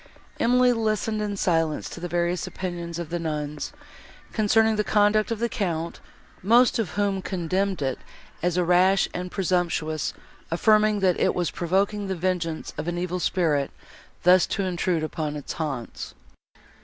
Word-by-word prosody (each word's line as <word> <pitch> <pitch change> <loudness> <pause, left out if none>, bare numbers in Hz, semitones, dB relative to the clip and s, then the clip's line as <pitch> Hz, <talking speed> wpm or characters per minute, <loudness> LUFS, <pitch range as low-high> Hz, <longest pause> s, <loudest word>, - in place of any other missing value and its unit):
Emily 250 +1 +4
listened 215 -1 -1
in 205 -1 -2
silence 165 -4 +1
to - - -8
the 175 - -4
various 175 0 -1
opinions 175 -2 -5
of 170 -2 -6
the 175 - -1
nuns, 150 -2 -3 0.6
concerning 220 +1 +3
the 210 - +1
conduct 210 +1 +3
of 230 - -1
the 235 +2 0
Count, 170 -9 -3 0.4
most 235 +5 +4
of 195 -8 -2
whom 200 -2 0
condemned 185 -1 -1
it 130 -2 -1 0.4
as 180 +1 +1
rash 180 +2 +4
and 180 0 -4
presumptuous, 175 -5 -1 0.3
affirming, 210 +4 +3
that 185 -2 +2
it - - +2
was 175 -2 0
provoking 195 +4 0
the 190 - -2
vengeance 175 -2 -2
of - - -4
an 175 0 -2
evil 180 +1 -2
spirit, 155 -5 +1 0.5
thus 180 -1 +6
to 200 - -1
intrude 175 -2 0
upon 155 -1 -3
its 145 - -5
haunts. 140 -7 -5
180 Hz, 155 wpm, -25 LUFS, 165-205 Hz, 0.6 s, thus